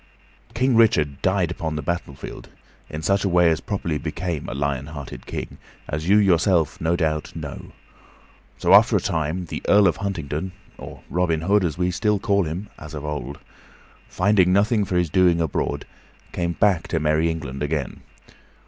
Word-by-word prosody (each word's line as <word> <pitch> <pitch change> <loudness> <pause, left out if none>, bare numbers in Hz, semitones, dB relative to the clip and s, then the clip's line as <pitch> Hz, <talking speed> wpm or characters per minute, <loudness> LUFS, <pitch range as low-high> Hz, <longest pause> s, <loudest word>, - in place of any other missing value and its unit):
King 130 +1 +2
Richard 75 -11 +3
died 95 -2 +1
upon 80 -2 -3
the 75 - -4
battlefield, 85 -6 -5 0.4
in 75 +1 -6
such 100 +3 +2
a 100 - +1
way 90 -1 +4
as 80 - 0
properly 85 -7 -2
became 85 -5 -4
a 60 - -5
lion 70 -1 -2
hearted 75 -3 -9
king, - - -6 0.3
as 75 +4 -3
you 105 - +6
yourself, 90 -4 +2
no 80 +2 +1
doubt, 80 -3 -2
know; - - -7 0.9
so, - - +3
after - - +7
a - - +4
time, 80 +3 -2
the - - -6
Earl 100 0 +6
of 85 - +1
Huntingdon 95 -3 -4 0.3
or - - -10
Robin 85 -2 0
Hood, 100 +4 +3
as 85 -3 -1
we 90 0 +1
still 105 +3 +1
call 100 -1 +1
him 85 +7 -5
as 75 +1 -9
of 75 0 -6
old 75 -2 -4 0.7
finding 95 -1 +3
nothing 105 +2 +3
for 95 - -3
his 90 -3 +1
doing 90 -2 +4
abroad, 80 -4 -2 0.5
came 85 -1 -2
back 95 -3 +2
to 80 - -1
merry 75 +2 +2
England 75 -5 -5
again. 75 -3 -3
85 Hz, 175 wpm, -23 LUFS, 75-95 Hz, 0.9 s, after